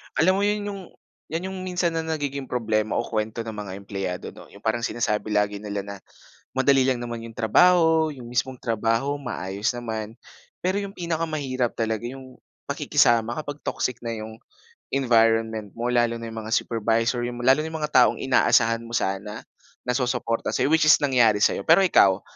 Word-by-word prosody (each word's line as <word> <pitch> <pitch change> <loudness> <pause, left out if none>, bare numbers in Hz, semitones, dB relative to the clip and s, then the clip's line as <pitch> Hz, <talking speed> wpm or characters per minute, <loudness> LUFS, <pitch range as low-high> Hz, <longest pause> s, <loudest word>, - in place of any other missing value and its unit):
Alam 185 +4 +3
mo - - 0
'yan 205 0 -1
yung 195 -1 -7 0.5
'yan 170 +4 -4
yung 190 - -6
minsan 180 -2 -1
na 165 - -2
nagiging 145 -4 -3
problema 110 -3 -1
o 120 - +1
kuwento 110 +1 -3
ng 115 - -6
mga 105 -3 -7
empleyado 95 -2 -5
'no. - - -14
Yung 100 - -17
parang 110 +1 0
sinasabi 110 -3 -1
lagi 105 -1 +1
nila 100 -1 -4
na, 100 0 -7 0.6
madali 135 0 +3
lang 130 -2 +1
naman 120 -1 -5
yung 115 - -8
trabaho, 160 - +4
yung 125 -4 -10
mismong 125 +1 -2
trabaho 115 +4 0
maayos 105 -6 -3
naman. 115 -1 -6 0.4
Pero 185 +2 -1
yung 200 - -6
pinakamahirap 155 -7 -2
talaga 110 -1 -1
yung 130 +1 -8 0.3
pakikisama 115 -1 +2
kapag 145 -1 -7
toxic 125 -2 -2
na 115 - -3
yung 110 0 -6 0.6
environment 115 -4 +2
mo. 120 +1 -2
Lalo 120 -1 +2
na 115 -1 -7
yung 110 - -6
mga 110 - +1
supervisor, 115 +2 0
yung 120 0 -6
lalo 135 +4 +5
na 155 - -2
yung 160 0 -5
mga 150 - -2
taong 120 -1 +4
inaasahan 115 -3 +3
mo 120 - -4
sana, 105 +1 -2 0.4
na 125 - -1
susuporta 125 -3 -1
sa - - +1
'yo, 145 - +1
which 160 -1 +4
is - - +9
nangyari 120 -7 +3
sa - - +5
'yo. - - -6
Pero 165 +4 +7
ikaw, 100 - +4
120 Hz, 185 wpm, -24 LUFS, 110-140 Hz, 0.6 s, is